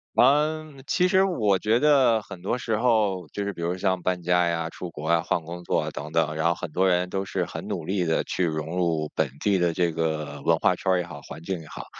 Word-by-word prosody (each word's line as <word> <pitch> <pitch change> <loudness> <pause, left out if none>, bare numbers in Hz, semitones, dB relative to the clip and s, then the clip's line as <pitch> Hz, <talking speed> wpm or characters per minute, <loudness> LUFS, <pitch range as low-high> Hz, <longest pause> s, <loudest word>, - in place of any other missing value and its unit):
呃， 150 +4 +3 0.2
其 180 0 +3
实 190 0 +4
我 110 - +2
觉 110 +4 +2
得 130 -6 +4
很 90 - -10
多 105 +7 -1
时 115 -2 -1
候， 105 -7 +1
就 100 - -3
是 100 0 -3
比 85 - -9
如 85 +2 -1
像 95 -1 0
搬 90 0 -1
家 90 0 +3
呀、 85 -1 -1
出 90 - -7
国 75 -1 -7
啊、 85 0 +3
换 85 - 0
工 85 +2 -8
作 - - +1
啊 - - -4
等 75 +2 -7
等， 80 -1 +1
然 80 +1 +1
后 85 - +2
很 - - -6
多 95 +4 +2
人 90 0 +1
都 95 - -1
是 - - -2
很 - - -7
努 - - -4
力 95 +1 0
地 80 - +1
去 95 - -2
融 80 0 -2
入 80 -4 0
本 80 -3 +1
地 100 -2 +2
的 85 -1 +2
这 85 0 +1
个 80 -3 -3
文 85 - +3
化 90 - +2
圈 95 +2 -1
儿 90 - +4
也 90 - -2
好、 85 -5 -10
环 70 +3 -10
境 95 0 -3
也 80 - -13
好。 - - -8
90 Hz, 280 characters per minute, -25 LUFS, 80-105 Hz, 0.2 s, 实